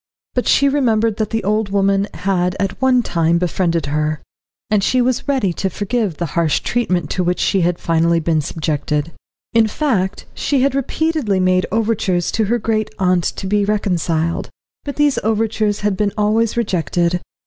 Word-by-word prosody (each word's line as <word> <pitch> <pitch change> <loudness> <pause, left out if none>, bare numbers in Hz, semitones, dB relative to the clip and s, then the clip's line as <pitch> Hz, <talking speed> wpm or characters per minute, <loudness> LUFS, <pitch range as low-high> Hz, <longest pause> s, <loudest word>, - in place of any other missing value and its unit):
But 250 - -1
she 280 - +4
remembered 230 -6 +1
that 215 -2 -1
the 225 -2 -2
old 210 +1 0
woman 195 0 +1
had 180 -1 0
at 195 +3 -2
one 255 -2 +3
time 170 -3 +1
befriended 170 -2 0
her, 150 +1 -1 0.5
and 210 -2 +3
she 255 - +2
was 250 +2 0
ready 260 -11 +1
to 190 - -2
forgive 205 -2 -2
the 170 - -2
harsh 165 -3 +1
treatment 180 -10 -1
to 185 - 0
which 180 0 0
she 195 - +2
had 175 0 +1
finally 165 0 +2
been 160 -1 +1
subjected. 150 0 -2 0.4
In 225 -1 +4
fact, 210 -6 -1
she 275 -3 0
had 275 -1 +2
repeatedly 275 -6 0
made 185 0 +2
overtures 210 -5 0
to 220 - +1
her 235 +4 +1
great 215 -1 -1
aunt 180 -2 +2
to - - -3
be 205 +1 +1
reconciled, 170 -5 -1 0.4
but 285 - -4
these 295 -2 +2
overtures 215 -1 0
had 205 -1 0
been 205 0 0
always 215 +2 +1
rejected. 175 -4 0
200 Hz, 170 wpm, -18 LUFS, 175-225 Hz, 0.5 s, she